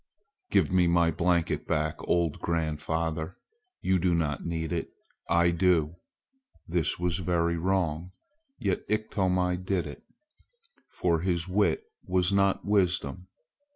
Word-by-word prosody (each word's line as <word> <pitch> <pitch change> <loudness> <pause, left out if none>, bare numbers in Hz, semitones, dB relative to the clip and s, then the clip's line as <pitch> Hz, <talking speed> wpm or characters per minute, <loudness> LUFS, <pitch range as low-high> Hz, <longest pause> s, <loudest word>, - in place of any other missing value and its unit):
"Give 95 -6 +3
my 85 -2 +3
blanket 85 +1 0
back, 75 0 0
old 85 -3 +1
grandfather! 80 0 -2 0.4
You 95 -1 +2
do 90 0 +2
not 75 -4 -1
need 80 -2 -3
it. - - -2 0.4
I 85 0 +4
do!" 85 -2 +2 0.7
This 85 -2 0
was 90 0 -1
very 85 -1 +1
wrong, 90 -1 -1 0.5
yet - - -1
Iktomi 95 -4 +1
did 90 0 -1
it, 75 - -9 0.9
for 85 -2 0
his 85 0 -1
wit 100 +2 +1 0.2
was 90 +1 +2
not 100 0 +2
wisdom. 90 -4 +1
85 Hz, 120 wpm, -28 LUFS, 80-90 Hz, 0.9 s, I